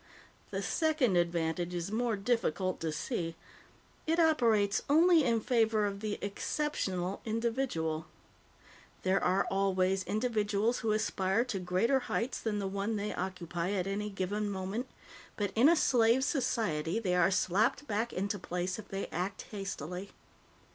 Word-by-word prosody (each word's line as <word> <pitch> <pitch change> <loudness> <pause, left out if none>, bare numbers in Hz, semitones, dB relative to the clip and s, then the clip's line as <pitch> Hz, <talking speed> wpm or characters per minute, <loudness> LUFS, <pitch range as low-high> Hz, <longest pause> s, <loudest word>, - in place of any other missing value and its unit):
The - - -3
second 310 - +2
advantage 170 0 0
is 175 +3 -3
more 230 0 0
difficult 195 -4 0
to 160 -1 -2
see. 165 0 -3 0.7
It 325 +2 +2
operates 225 -11 +3
only 330 +2 +6
in 235 -3 +2
favor 225 -3 +2
of 200 -1 -3
the 210 -1 -3
exceptional 200 -4 -2
individual. 225 -9 -1 1.0
There 190 +1 +2
are 185 +2 +2
always 190 -1 +1
individuals 215 0 0
who 225 - 0
aspire 215 0 +1
to 205 -6 -3
greater 185 +9 +2
heights 245 0 -2
than 215 -2 -2
the 200 -1 -2
one 200 +3 -2
they 210 0 -2
occupy 180 0 -3
at 185 -3 0
any 205 +2 -2
given 205 +2 -2
moment, 200 +6 -3 0.5
but 205 -2 -1
in 245 +7 +6
a 340 - +6
slave 245 -4 +4
society, 220 - 0
they 195 -6 0
are 180 0 +4
slapped 215 +9 +1
back 225 0 -1
into 200 +2 -2
place 180 +3 -3
if 210 - -9
they 195 0 -3
act 185 +3 -3
hastily. 195 -2 -5
205 Hz, 145 wpm, -32 LUFS, 185-230 Hz, 1.0 s, only